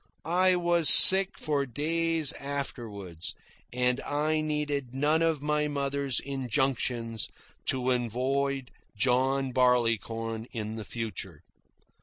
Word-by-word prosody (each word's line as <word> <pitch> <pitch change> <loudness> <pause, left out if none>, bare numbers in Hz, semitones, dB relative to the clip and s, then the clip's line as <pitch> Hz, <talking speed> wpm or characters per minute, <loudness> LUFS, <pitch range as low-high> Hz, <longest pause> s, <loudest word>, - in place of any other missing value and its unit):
I 180 +3 +2
was 170 -3 +3
sick 190 0 +9
for 145 -3 -2
days 160 +3 -1
afterward, 115 - -6 0.5
and 125 +1 0
I 155 +2 -1
needed 145 -4 -3
none 150 +4 +1
of 160 -3 0
my 150 0 0
mother's 140 -2 -2
injunctions 125 -4 -3 0.4
to 130 -1 0
avoid 130 +3 -2 0.2
John 130 +4 0
Barleycorn 115 -2 0
in 110 -2 -5
the 110 -1 -7
future. 105 -8 -7
135 Hz, 105 wpm, -27 LUFS, 120-150 Hz, 0.5 s, sick